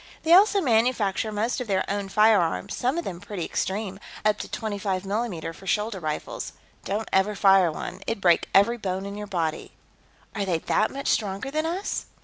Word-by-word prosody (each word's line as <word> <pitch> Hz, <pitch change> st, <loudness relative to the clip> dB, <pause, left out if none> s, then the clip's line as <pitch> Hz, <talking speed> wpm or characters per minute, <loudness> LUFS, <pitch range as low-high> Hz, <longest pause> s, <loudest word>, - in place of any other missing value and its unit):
They 325 Hz, -, +4 dB
also 400 Hz, +2 st, +6 dB
manufacture 225 Hz, -, +1 dB
most 220 Hz, +5 st, -1 dB
of 250 Hz, -, -5 dB
their 190 Hz, -2 st, +1 dB
own 200 Hz, 0 st, -2 dB
firearms, 195 Hz, -, +3 dB
some 255 Hz, +6 st, 0 dB
of 345 Hz, -, -1 dB
them 175 Hz, -, -6 dB
pretty 200 Hz, -4 st, -5 dB
extreme 195 Hz, 0 st, -3 dB, 0.3 s
up 215 Hz, 0 st, +3 dB
to -, -, -6 dB
25 200 Hz, -3 st, -2 dB
mm 195 Hz, -5 st, -3 dB
for 190 Hz, +4 st, -13 dB
shoulder 210 Hz, 0 st, 0 dB
rifles. 155 Hz, -3 st, -4 dB, 0.3 s
Don't 205 Hz, +3 st, -2 dB
ever 195 Hz, +2 st, +3 dB
fire 195 Hz, -4 st, +5 dB
one; 180 Hz, +4 st, -6 dB
it'd 225 Hz, -, -1 dB
break 175 Hz, -3 st, +3 dB
every 220 Hz, +5 st, +4 dB
bone 190 Hz, -1 st, -3 dB
in 200 Hz, -, -5 dB
your 210 Hz, 0 st, -6 dB
body." 165 Hz, -5 st, -3 dB, 0.6 s
"Are 205 Hz, -, -2 dB
they 180 Hz, -4 st, 0 dB
that 215 Hz, +6 st, +1 dB
much 275 Hz, +1 st, -6 dB
stronger 205 Hz, +5 st, -1 dB
than 310 Hz, +2 st, 0 dB
us?" 370 Hz, +5 st, -3 dB
205 Hz, 185 wpm, -25 LUFS, 190-225 Hz, 0.6 s, also